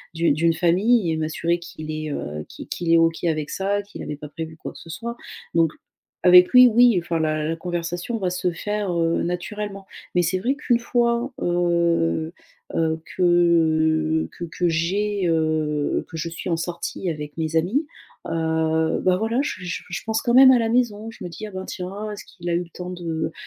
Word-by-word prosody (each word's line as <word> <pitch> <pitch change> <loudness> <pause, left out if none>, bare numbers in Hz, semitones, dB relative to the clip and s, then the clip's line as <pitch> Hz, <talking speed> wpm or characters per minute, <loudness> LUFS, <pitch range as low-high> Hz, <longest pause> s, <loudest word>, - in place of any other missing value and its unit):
d'u 165 -1 +2
d'une 165 +3 +2
famille 185 +3 +3
et - - 0
m'assurer 165 +2 -1
qu'il 155 -2 -8
est, 155 -1 -4
heu 75 - -4
qui - - -9
qu'il 170 -1 -2
est 165 - +7
OK 165 0 +2
avec 155 -2 -1
ça, 200 +1 -1
qu'il 205 - -10
avait 150 - -5
pas 150 0 -9
prévu 160 +1 -7
quoi - - -7
que - - -13
ce 165 - -13
soit. 235 +8 -5 0.4
Donc 165 -2 +3 0.5
avec 180 0 +8
lui 250 0 +8
oui, 235 -4 +5
enfin 170 -1 -1
la 155 -1 0
la 165 - -1
conversation 175 +5 -3
va 185 -2 0
se 180 0 -1
faire, 205 +1 -2
heu, 165 0 +1
naturellement. 195 +3 -4 0.3
Mais 175 - +4
c'est 175 +3 +1
vrai 250 +7 +1
qu'une 250 -5 +1
fois, 235 +2 0
heu 170 -2 +1 0.4
heu, 160 -1 0 0.2
que, - - -2
heu, 160 -2 +3
que 175 - -6
que 175 +2 -1
j'ai 195 +4 0
heu 155 -2 0
que 165 - -7
je 165 +1 -3
suis 170 +2 -6
en 165 - +1
sortie 170 +2 -4
avec 150 -2 -5
mes 160 0 -2
amis, 225 - +1 0.4
heu, 160 0 0
bah, 185 -1 +3
voilà 225 +4 0
je - - -2
je 175 - -3
je 180 - -4
pense 220 0 0
quand 235 - 0
même 260 0 +9
à 250 - +5
la 225 -1 0
maison, 225 -3 0
je 225 - -11
me 175 - -5
dis: 215 +5 -7
«Ah - - -10
ben 190 0 -6
tiens, 200 +4 -5
est-ce 205 - -7
qu'il 175 -2 -10
a - - +1
eu - - +2
le 170 - -16
temps 180 0 -6
de 165 -3 -3
175 Hz, 205 wpm, -23 LUFS, 160-205 Hz, 0.5 s, même